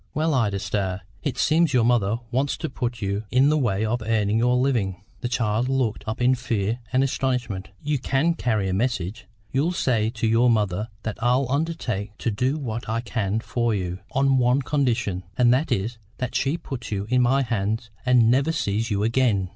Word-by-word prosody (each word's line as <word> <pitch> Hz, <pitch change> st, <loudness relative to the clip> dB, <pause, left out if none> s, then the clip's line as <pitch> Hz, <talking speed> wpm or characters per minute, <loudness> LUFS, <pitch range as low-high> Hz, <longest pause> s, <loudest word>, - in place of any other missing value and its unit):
"Well, 155 Hz, +1 st, +1 dB
Ida 110 Hz, -7 st, +1 dB
Starr, 95 Hz, -1 st, -2 dB, 0.2 s
it 135 Hz, -4 st, -3 dB
seems 155 Hz, +5 st, +3 dB
your 120 Hz, -, +4 dB
mother 115 Hz, -3 st, +2 dB
wants 135 Hz, +3 st, 0 dB
to -, -, -4 dB
put 120 Hz, -3 st, -3 dB
you 100 Hz, +2 st, -2 dB
in 130 Hz, +3 st, +4 dB
the 155 Hz, -, +3 dB
way 110 Hz, -5 st, +1 dB
of 120 Hz, +2 st, -1 dB
earning 110 Hz, -1 st, +1 dB
your 125 Hz, +1 st, +3 dB
living." 115 Hz, -8 st, 0 dB, 0.2 s
The 120 Hz, -, -3 dB
child 115 Hz, 0 st, 0 dB
looked 130 Hz, -5 st, 0 dB
up 110 Hz, -, -3 dB
in 125 Hz, +1 st, +5 dB
fear 115 Hz, -3 st, -1 dB
and 130 Hz, +1 st, +3 dB
astonishment. 125 Hz, -8 st, -2 dB
"You 150 Hz, -1 st, 0 dB
can 135 Hz, +6 st, +1 dB
carry 110 Hz, -10 st, 0 dB
a 95 Hz, -, -1 dB
message? 100 Hz, -2 st, -2 dB, 0.2 s
You'll 150 Hz, +7 st, +1 dB
say 115 Hz, -9 st, +1 dB
to 115 Hz, -1 st, -3 dB
your 115 Hz, +2 st, +4 dB
mother 105 Hz, -2 st, +1 dB, 0.2 s
that 110 Hz, -, -5 dB
I'll 125 Hz, +3 st, +3 dB
undertake 125 Hz, -9 st, -2 dB
to 115 Hz, -, -1 dB
do 130 Hz, +8 st, 0 dB
what 120 Hz, -6 st, -4 dB
I 115 Hz, +1 st, 0 dB
can 110 Hz, -3 st, -1 dB
for 120 Hz, -1 st, 0 dB
you, 90 Hz, -1 st, -3 dB
on 135 Hz, 0 st, +3 dB
one 125 Hz, +3 st, +3 dB
condition, 120 Hz, -10 st, 0 dB, 0.2 s
and 120 Hz, -1 st, +5 dB
that 135 Hz, +6 st, 0 dB
is 110 Hz, +4 st, -1 dB, 0.2 s
that 125 Hz, -1 st, -3 dB
she 140 Hz, +5 st, 0 dB
puts 135 Hz, -9 st, -7 dB
you 100 Hz, -1 st, -2 dB
in 125 Hz, 0 st, +4 dB
my 135 Hz, +3 st, +3 dB
hands 110 Hz, -1 st, -2 dB
and 125 Hz, -3 st, +4 dB
never 135 Hz, +5 st, +3 dB
sees 110 Hz, -5 st, -1 dB
you 100 Hz, -1 st, 0 dB
again." 110 Hz, -5 st, +2 dB
120 Hz, 195 wpm, -24 LUFS, 105-130 Hz, 0.2 s, in